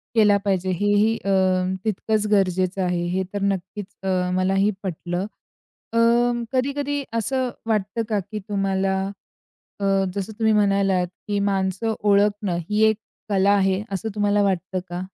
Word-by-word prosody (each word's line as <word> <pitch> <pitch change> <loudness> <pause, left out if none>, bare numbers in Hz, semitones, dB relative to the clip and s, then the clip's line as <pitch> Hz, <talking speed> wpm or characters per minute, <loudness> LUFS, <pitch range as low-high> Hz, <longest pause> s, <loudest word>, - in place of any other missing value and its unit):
केला 210 -2 +5
पाहिजे 190 -2 0
हेही 205 +4 +2
अ, - - 0 0.6
तितकंच 215 0 0
गरजेचं 185 -1 +1
आहे, 180 -1 0
हे 185 +2 0
तर 205 - -2
नक्कीच 195 +1 -2 0.2
अ, 185 -1 0
मलाही 195 +2 +2
पटलं. 175 0 -3 0.7
अ, - - 0 0.6
कधी-कधी 280 +2 -1
असं 255 +3 0 0.2
वाटतं 215 +1 0
का, 210 -2 +1
की 205 +3 -6
तुम्हाला 195 -1 -1 0.8
अ, - - -2 0.3
जसं 200 +2 -4
तुम्ही 220 -1 +3
म्हणालात 195 -3 +2 0.2
की 205 -1 0
माणसं 195 +2 0
ओळखणं 205 -2 +2
ही 210 +1 +2
एक 220 - +1 0.3
कला 200 -1 +3
आहे, 195 -1 +2
असं 195 +3 -2
तुम्हाला 205 0 +2
वाटतं 190 -1 -1
का? 175 +1 -4
200 Hz, 140 wpm, -23 LUFS, 190-210 Hz, 0.8 s, केला